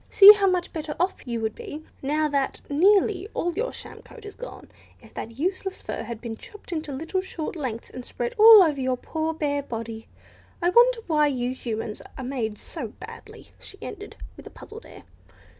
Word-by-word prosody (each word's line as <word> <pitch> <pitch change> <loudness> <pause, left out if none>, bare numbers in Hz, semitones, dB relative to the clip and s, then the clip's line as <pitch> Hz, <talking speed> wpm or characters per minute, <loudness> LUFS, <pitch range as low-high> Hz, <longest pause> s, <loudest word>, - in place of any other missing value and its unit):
See 405 +1 +11
how 405 -2 +1
much 365 -2 0
better 305 -2 -4
off 360 -6 -1
you 235 -2 -2
would 220 -1 -1
be, 305 +2 -8 0.2
now 305 +3 +1
that 280 -2 -1
nearly 390 +4 +3
all 350 0 -1
your 470 +8 -2
sham - - -10
coat 450 -3 -14
is 415 - -8
gone, - - -10 0.3
if - - -18
that 230 +1 -7
useless 375 +4 -2
fur - - -5
had 235 -2 -6
been 225 -2 -6
chopped 420 - -13
into 310 -3 -3
little, 325 +7 -2
short 370 +1 -6
lengths 250 -8 -5
and 255 - -8
spread 480 - -4
all 435 -2 +10
over 295 -5 0
your 255 -1 0
poor 320 +4 -3
bare 290 -3 -1
body. 225 -3 -7 0.5
I 350 +1 +2
wonder 480 +2 +5
why 300 -3 +3
you 250 -3 -1
Humans 225 -4 -5 0.2
are 260 - -5
made 240 -5 -3
so - - -6
badly," - - -12
she 390 - -11
ended, - - -8 0.2
with - - -11
a - - -8
puzzled 445 +2 -12
air. - - -13
310 Hz, 195 wpm, -25 LUFS, 255-385 Hz, 0.5 s, See